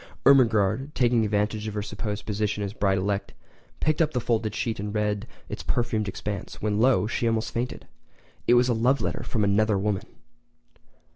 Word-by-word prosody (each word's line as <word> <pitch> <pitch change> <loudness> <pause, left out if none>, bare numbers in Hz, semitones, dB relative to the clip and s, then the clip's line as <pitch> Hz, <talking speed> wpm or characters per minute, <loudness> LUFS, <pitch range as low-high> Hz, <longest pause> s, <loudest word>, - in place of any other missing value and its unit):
Ermengarde, 115 -2 +4
taking 120 -2 +3
advantage 105 +1 0
of 105 - -5
her 105 - -2
supposed 105 0 -5
position 105 -1 -1
as 100 - -3
a - - -16
bride 95 -1 +2
elect, 100 +2 -2 0.5
picked 155 +1 +1
up 155 -1 +2
the 125 - +1
folded 110 -3 -1
sheet 115 -3 -2
and 105 +1 -4
read 105 +1 -1 0.2
its - - -6
perfumed 115 -3 -1
expanse—when 105 +1 -3
lo! 125 -2 +4
she 115 +1 -1
almost 115 0 -1
fainted! 120 +2 -3 0.6
It 120 - +6
was 120 +1 +5
a 125 - +2
love 125 +4 +2
letter - - -2
from 110 -4 -1
another 105 +1 +3
woman!! 100 0 -1
110 Hz, 180 wpm, -26 LUFS, 105-120 Hz, 0.6 s, It